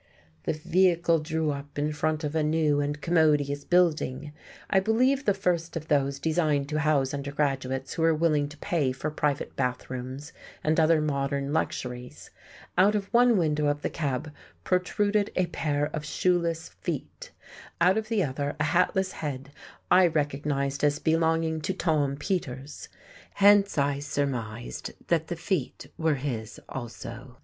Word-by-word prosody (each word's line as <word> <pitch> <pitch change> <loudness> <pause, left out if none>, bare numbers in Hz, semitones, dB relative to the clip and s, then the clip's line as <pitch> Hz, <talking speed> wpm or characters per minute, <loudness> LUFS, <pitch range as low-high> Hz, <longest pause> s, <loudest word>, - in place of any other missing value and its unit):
The - - +1
vehicle 170 +1 +2
drew 155 0 -1
up 140 0 -7
in 150 +1 0
front 155 +1 -1
of 150 0 -2
a 160 - +1
new 150 -1 +2
and 145 +1 -2
commodious 150 -4 +2
building, 155 -5 +1 0.3
I 195 - +3
believe 255 +7 +2
the 205 - +4
first 170 -3 -1
of 155 0 -8
those 140 -2 +2
designed 155 -2 +1
to 155 0 -1
house 145 -3 +2
undergraduates 140 -2 -2
who - - -3
were 165 0 +4
willing 150 -3 +1
to 150 - -12
pay 150 -8 0
for 145 +4 -4
private 150 -2 -1
bathrooms 130 +2 -4 0.3
and 155 +2 +2
other 160 0 +4
modern 140 -1 -1
luxuries; 125 -5 -4 0.5
out 200 +3 +5
of 195 -2 -3
one 240 -1 +5
window 150 -3 +1
of 145 0 -1
the - - -1
cab 145 -1 -2 0.3
protruded 205 +3 +1
a 185 - +2
pair 150 -4 -1
of 150 - -4
shoeless 170 0 0
feet, - - -6 0.5
out 180 +2 +5
of 220 0 -2
the 215 -3 +1
other 140 0 -3
a - - +2
hatless 180 +4 +2
head 140 -2 -5 0.4
I 180 0 +7
recognized 145 -2 -1
as 145 0 +3
belonging 160 0 +1
to 190 - -2
Tom 150 -6 +1
Peters; 145 -4 -4 0.5
hence 200 -1 +5
I 140 0 +1
surmised 130 -6 -3 0.2
that 165 -2 +2
the 175 - -3
feet 165 -5 -3
were 160 -2 +1
his 120 -5 -4
also. 125 +1 -8
150 Hz, 155 wpm, -27 LUFS, 140-170 Hz, 0.5 s, I